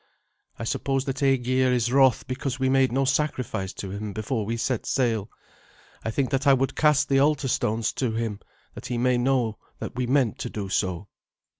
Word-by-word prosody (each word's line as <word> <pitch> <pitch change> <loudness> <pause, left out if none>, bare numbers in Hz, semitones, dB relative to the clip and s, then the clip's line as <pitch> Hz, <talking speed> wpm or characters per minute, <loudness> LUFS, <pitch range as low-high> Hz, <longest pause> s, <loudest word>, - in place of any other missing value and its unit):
"I - - -5
suppose 135 +3 -1
that 135 0 -3
Aegir 130 -1 +2
is 120 -1 +1
wroth 135 -2 +4
because 130 0 -3
we 130 0 +2
made 135 -1 +3
no 135 +2 +1
sacrifice 130 -9 -1
to 95 - -6
him 100 +1 -5
before 110 +2 -2
we 115 +1 -1
set 120 0 -2
sail. 115 -5 0 0.7
I - - -2
think 130 +3 -1
that 135 +2 0
I 140 - +8
would 135 0 -1
cast 150 -2 +3
the 135 -1 +3
altar 145 -1 +2
stones 110 -2 0
to 125 -3 +1
him, 110 -3 -2 0.3
that - - -8
he 120 - -2
may 125 +1 +2
know 120 -4 +1 0.2
that - - -6
we 125 -1 -1
meant 130 -4 +1
to - - -4
do 100 -3 -5
so." 95 0 -1
125 Hz, 195 wpm, -25 LUFS, 110-135 Hz, 0.7 s, I